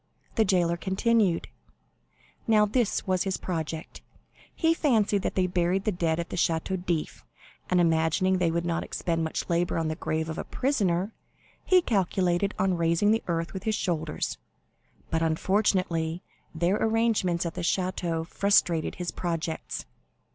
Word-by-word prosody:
The 225 - +3
jailer 175 -3 +2
continued: 190 0 +1 1.0
"Now 215 -2 +5
this 220 +1 0
was 185 -1 +1
his 190 -1 -1
project. 160 -2 -5 0.5
He 325 -1 +3
fancied 220 -10 +2
that - - -3
they 185 - +2
buried 180 +1 +1
the 215 - +1
dead 170 -3 0
at 170 - -4
the - - -4
Château 170 +2 0
d'If, 170 -4 -2 0.5
and 180 - +3
imagining 165 +3 +2
they 175 -2 +2
would 170 +1 -1
not 170 0 -1
expend 165 -1 -2
much 160 - -3
labor 175 0 0
on 165 -1 0
the 155 - -2
grave 160 0 -2
of 160 0 -4
a - - -2
prisoner, 205 -7 0 0.5
he 365 -2 +4
calculated 190 - +1
on 190 -2 +1
raising 170 +5 +2
the 225 0 +2
earth 165 -1 -2
with 190 - -5
his 220 -1 +1
shoulders, 160 -5 -2 0.7
but 165 - +1
unfortunately 170 -1 +1 0.3
their 175 +5 +2
arrangements 220 -7 +1
at 165 - -3
the - - -5
Château 175 -2 -1
frustrated 175 -3 +2
his 180 -1 -4
projects. 165 -2 -3
180 Hz, 155 wpm, -27 LUFS, 165-200 Hz, 1.0 s, Now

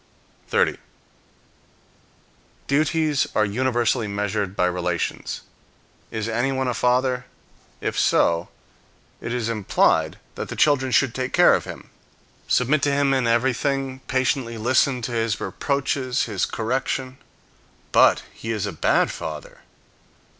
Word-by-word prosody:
30. - - +1 1.9
Duties 155 0 +1
are 110 - +3
universally 120 +1 0
measured 100 -1 -2
by 90 - +2
relations. 90 -1 -2 0.7
Is 110 -1 -3
anyone 130 +3 0
a 125 - 0
father? 125 +2 +1 0.5
If - - -2
so, 85 0 +2 0.7
it 115 - -5
is 120 -2 -1
implied 110 -4 +1 0.2
that - - -6
the - - -5
children 130 -3 +3
should 130 -2 +3
take 130 0 -3
care - - +6
of - - 0
him, - - -10 0.6
submit 140 +4 +2
to 145 - +2
him 140 -1 +2
in 130 -3 +1
everything, 130 +3 0
patiently 130 -2 0
listen 125 +2 +2
to 120 - -3
his 115 -2 -1
reproaches, 135 -2 -1
his 105 -5 -1
correction. 130 +3 -2 0.7
But - - +5
he 115 - -8
is 105 -3 -1
a 100 - -3
bad 80 - +2
father. 75 -2 -7
125 Hz, 125 wpm, -23 LUFS, 110-135 Hz, 1.9 s, care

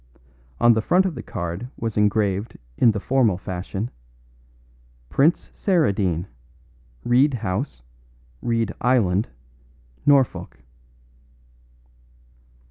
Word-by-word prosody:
On 120 0 +6
the 110 - +1
front 180 - +3
of 185 - -1
the - - -6
card 85 +8 -5
was 115 -2 -3
engraved 105 0 +1 0.2
in 120 - +5
the 105 -1 0
formal 120 -4 +2
fashion, 95 +4 -5 1.2
"Prince 150 - +2
Saradine, 100 - +1 0.8
Reed 130 +3 +3
House, 105 - -3 0.6
Reed 115 -3 0
Island, 110 -6 +2 0.8
Norfolk." 135 - +2
110 Hz, 90 wpm, -23 LUFS, 95-130 Hz, 1.2 s, On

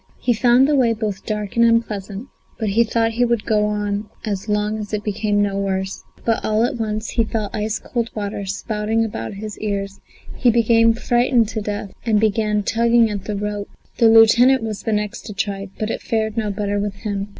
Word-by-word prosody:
He 245 - +2
found 245 +3 +4
the 295 - +2
way 245 -4 +3
both 210 -3 -4
dark 210 -2 -3
and 235 - +4
unpleasant, 220 -1 0 0.3
but 220 -2 -1
he 225 +4 +4
thought 225 0 0
he 240 +2 +1
would 235 -3 0
go 210 -2 +2
on 205 0 -2 0.2
as 205 0 -3
long 210 +1 0
as 210 0 -7
it 210 - -4
became 205 0 0
no 200 -1 -1
worse. 190 -1 -2 0.2
But 225 -1 +1
all 215 +1 +1
at 240 - 0
once 215 -1 -3
he 230 - +2
felt 215 -2 -3
ice 215 0 -1
cold 235 -2 -3
water 205 -1 -4
spouting 215 +3 -1
about 115 - -5
his 210 +1 -7
ears; 200 -2 -3 0.4
he 250 - +3
became 230 0 +4
frightened 240 -1 +2
to 220 -1 -3
death 205 -1 -4
and 220 -3 +2
began 210 -1 +1
tugging 230 +1 +3
at 200 -2 -5
the 210 - -3
rope. 205 0 -4 0.3
The 230 - +6
lieutenant 230 +3 +6
was 215 -2 -4
the 225 - -2
next 210 -1 -2
to 210 - -6
try, 195 -1 -3
but 215 +1 -2
it - - -4
fared 220 -1 -1
no 220 -2 -1
better 205 0 -2
with 205 -1 -3
him. 200 -1 -4
215 Hz, 205 wpm, -20 LUFS, 205-230 Hz, 0.4 s, The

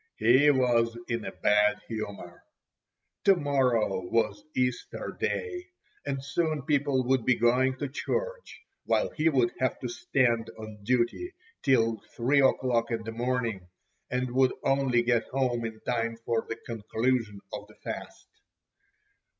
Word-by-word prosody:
He 130 +7 +5
was 120 -4 +2
in 115 -2 -2
a - - -4
bad 105 0 +3
humour. 100 -6 -6 0.8
To 195 - +7
morrow 130 - +1
was 105 -1 0
Easter 125 -1 -2
Day, 360 -5 -2 0.4
and 135 -1 -3
soon 155 -2 -1
people 140 -2 +1
would 130 -1 +2
be 125 - +3
going 130 +3 +2
to 145 - -2
church, - - -4 0.2
while - - +1
he 160 +1 +2
would 125 -6 +2
have 130 0 0
to 125 - -2
stand 120 -2 +1
on 110 -1 -9
duty 125 - 0 0.3
till 115 -5 +2 0.2
3 135 +4 +3
o'clock 125 -3 +2
in 115 -2 -2
the 115 - -5
morning, 115 -5 -2 0.4
and 125 0 -1
would 130 +1 +3
only 135 -3 +2
get 120 -1 +1
home 125 -3 0
in 110 -1 -6
time 115 -2 -1
for 115 -1 0
the 115 - -2
conclusion 115 -1 -2
of - - -6
the - - -18
fast. - - -7
125 Hz, 140 wpm, -28 LUFS, 115-135 Hz, 0.8 s, To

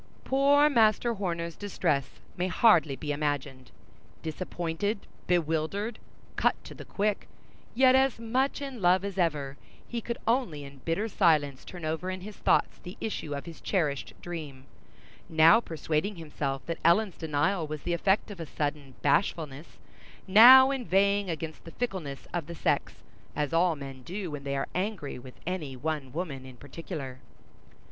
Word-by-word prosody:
Poor 280 +2 +4
Master 235 -3 +3
Horner's 170 -5 -3
distress 150 -9 -2 0.2
may 180 +1 -1
hardly 175 -8 +4
be 150 +1 -4
imagined. 145 -3 -3 0.5
Disappointed, 175 +5 -3 0.3
bewildered, 175 +6 0 0.4
cut - - +2
to - - -10
the - - -10
quick, 205 0 -1 0.5
yet 260 +1 +6
as 265 -1 +3
much 255 +5 -1
in 265 -5 -6
love 180 +2 +4
as 195 -1 -4
ever, 145 -5 0 0.3
he 235 -1 -4
could 235 +1 -4
only 225 - 0
in 140 0 -11
bitter 165 - -1
silence 155 -9 +2
turn 175 -3 -8
over 160 +4 -2
in 185 0 -4
his 205 +2 -9
thoughts - - +1
the 180 +1 -10
issue 155 -9 -4
of 140 - -6
his 170 -2 -10
cherished 150 -8 -1
dream; 150 -6 -7 0.6
now 160 +7 +7
persuading 165 0 -2
himself 145 -4 -4
that 165 - -4
Ellen's 185 +3 +3
denial 160 +3 0
was 150 -1 -6
the 175 - -1
effect 190 +5 +1
of 195 - -9
a 165 - -5
sudden 145 -3 -4
bashfulness, 150 -1 0 0.5
now 255 +7 +9
inveighing 200 -5 +1
against 160 -1 -5
the 165 - -11
fickleness 185 - -4
of 170 -4 -2
the 170 - -7
sex, - - 0 0.4
as 150 +1 -1
all 170 0 +3
men 135 -2 -8
do 180 +5 -5
when 145 -1 -6
they 140 0 -2
are 135 - -2
angry 185 -8 -3
with 125 0 -12
any 160 -7 -3
one 145 -1 -3
woman 150 -4 -4
in 130 -1 -12
particular. 135 -2 -7
170 Hz, 155 wpm, -28 LUFS, 145-200 Hz, 0.6 s, now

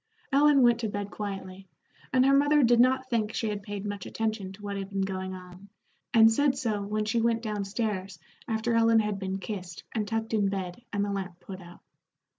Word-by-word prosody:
Ellen 280 -1 +5
went 240 -1 +5
to 230 - -1
bed 205 0 -4
quietly, 195 -2 -6 0.4
and 255 0 +4
her 275 0 +5
mother 290 +1 +4
did 240 0 +4
not 260 +1 +3
think 220 -3 -1
she 225 - -1
had 205 -1 -3
paid 205 0 -6
much 205 -2 -5
attention 220 -4 -3
to 205 +2 -14
what 200 0 -4
had 195 -1 -5
been 195 -1 -2
going 190 -1 -3
on, 180 +2 -12 0.4
and 225 0 +6
said 275 +2 +2
so 215 -4 -1
when 210 +1 -2
she 230 +2 +1
went 230 0 +1
down 210 -2 -2
stairs 195 -3 -3 0.3
after 225 +1 0
Ellen 230 -1 +5
had 210 -2 -2
been 190 0 -3
kissed 185 -4 -6
and 215 -2 -2
tucked 225 0 -2
in 205 -3 +2
bed 190 +1 -4
and 205 -1 0
the 205 - -3
lamp 185 -3 -4
put 190 +1 -9
out. 175 0 -14
210 Hz, 215 wpm, -28 LUFS, 195-230 Hz, 0.4 s, and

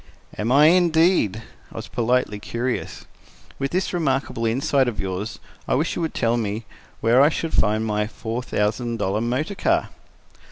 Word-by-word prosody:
"Am 110 +3 -2
I, 145 +3 +6
indeed?" 165 - +3 0.3
I - - -15
was - - -6
politely 120 -3 0
curious. 120 +4 -4 0.5
"With 135 0 -1
this 185 +4 -1
remarkable 135 -8 0
insight 130 +3 +1
of 115 -5 -3
yours, 95 +3 -4 0.3
I - - +2
wish 155 +5 0
you - - -3
would 160 - -3
tell 115 +1 +1
me 110 0 -3 0.4
where 120 +4 +5
I 145 - +6
shall 165 0 -3
find 110 -3 +1
my 105 -1 0
four 115 +2 -5
thousand 115 +1 -1
dollar 105 0 -1
motor 130 - -1
car." 330 - +1
120 Hz, 165 wpm, -23 LUFS, 110-150 Hz, 0.5 s, I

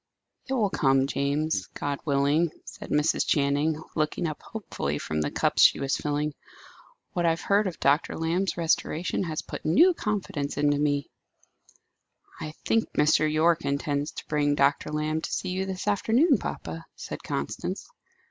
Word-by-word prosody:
"It - - 0
will 210 -6 +1
come, 135 -4 +3
James; 140 -5 -1
God 145 -1 -2
willing," 145 +3 +2 0.2
said - - -9
Mrs. 150 +2 +2
Channing, 145 +2 +1
looking 155 +2 -1
up 155 -2 -4
hopefully 75 - -4
from 75 +1 -2
the 75 - 0
cups - - +1
she - - +7
was 135 0 0
filling. 150 0 -1 0.8
"What 175 -1 +1
I - - +6
have 165 +1 -1
heard 200 +1 +2
of 175 - -5
Dr. 140 +4 +2
Lamb's 170 +3 0
restoration 165 0 0
has 155 -2 -3
put - - -7
new 335 - +5
confidence 195 - -3
into 145 0 +2
me." 145 -1 0 1.3
"I 155 0 -6
think 225 0 +1
Mr. 155 +1 +3
Yorke 165 +2 +3
intends 140 +1 -1
to - - -8
bring 145 -1 +1
Dr. 140 0 +2
Lamb 155 +1 -1
to - - -5
see 185 - -2
you 190 +1 -2
this 190 +1 -5
afternoon, 235 - +3
papa," - - -6
said - - -7
Constance. - - -4
155 Hz, 160 wpm, -27 LUFS, 145-175 Hz, 1.3 s, she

